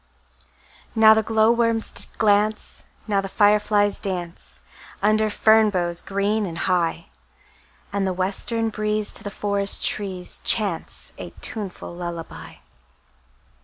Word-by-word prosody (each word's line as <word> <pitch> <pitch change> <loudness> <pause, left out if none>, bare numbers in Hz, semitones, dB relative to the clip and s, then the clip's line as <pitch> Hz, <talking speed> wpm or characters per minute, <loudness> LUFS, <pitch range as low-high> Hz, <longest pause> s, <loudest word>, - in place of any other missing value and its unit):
Now 220 -1 +7
the 220 - +2
glowworms 225 +1 +1 0.3
glance, 215 0 0 0.2
Now 200 -2 +1
the 195 - -6
fireflies 205 0 +2
dance, 175 -3 -6 0.4
Under 215 +1 +2
fern 220 +1 +4
boughs 175 -3 -2
green 200 +2 -1
and 165 -1 -7
high; 170 -2 -1 0.8
And 200 -1 0
the - - 0
western 205 +5 -1
breeze 215 -1 -2
To - - +4
the 205 - -4
forest 200 0 0
trees 190 -3 -1
Chants 200 -7 0
a - - -7
tuneful 200 -5 -5
lullaby. 170 -1 -7
205 Hz, 115 wpm, -22 LUFS, 185-215 Hz, 0.8 s, Now